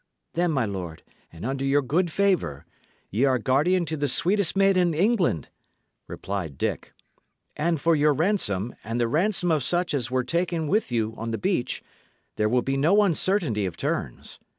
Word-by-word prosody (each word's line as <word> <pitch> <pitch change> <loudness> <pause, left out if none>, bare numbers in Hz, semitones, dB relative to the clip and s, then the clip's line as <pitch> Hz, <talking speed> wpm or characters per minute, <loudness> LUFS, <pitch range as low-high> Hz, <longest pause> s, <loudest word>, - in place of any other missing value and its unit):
"Then, 175 +1 +1
my 135 -7 +1
lord, 90 -6 -6 0.3
and 85 +5 -9
under 135 +1 -2
your 140 +1 +2
good 165 +6 0
favour, 180 - 0 0.5
ye 110 +7 +1
are 130 -2 +3
guardian 150 +10 +2
to 160 - -3
the 145 -1 -1
sweetest 190 +7 0
maid 195 0 +4
in 175 -3 +2
England," 180 - +1 0.6
replied 90 -8 -5
Dick; - - -3 0.6
"and 165 +1 0
for 165 +3 +3
your 150 0 +4
ransom, 140 - 0
and 115 +2 -3
the 120 - +2
ransom 175 - +1
of 155 -2 +2
such 175 +3 0
as 130 -4 -1
were 130 0 0
taken 170 +1 -1
with 205 - 0
you 110 -2 0
on 115 +1 -4
the 115 - -2
beach, 180 - -1 0.5
there 105 0 +1
will 125 +1 +2
be 135 0 -1
no 180 +9 +4
uncertainty 165 - 0
of 85 -2 -7
terms. - - -4
145 Hz, 175 wpm, -25 LUFS, 115-175 Hz, 0.6 s, maid